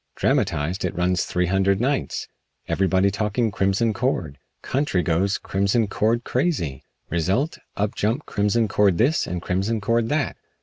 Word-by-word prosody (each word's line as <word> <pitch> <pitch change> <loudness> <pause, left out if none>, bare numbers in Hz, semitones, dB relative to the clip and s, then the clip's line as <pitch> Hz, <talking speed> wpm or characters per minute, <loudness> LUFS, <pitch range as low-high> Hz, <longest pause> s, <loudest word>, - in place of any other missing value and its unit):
Dramatized, 80 +6 0
it 90 - -2
runs 90 0 +1
three 90 0 0
hundred 95 +1 +2
nights. 135 +3 -1 0.4
Everybody 95 0 +2
talking 105 +3 0
Crimson 100 +4 +1
Cord. 95 - -2 0.2
Country 130 -10 0
goes 95 +4 +1
Crimson 100 +4 +1
Cord 115 +4 +1
crazy. 125 - -1 0.3
Result 95 - 0 0.2
up 105 0 0
jump 115 +8 -1
Crimson 105 +3 +1
Cord 100 -3 +3
this 140 +8 +2
and 90 -1 -4
Crimson 100 +5 0
Cord 115 +2 +1
that. 150 -1 0
100 Hz, 140 wpm, -23 LUFS, 90-115 Hz, 0.4 s, Cord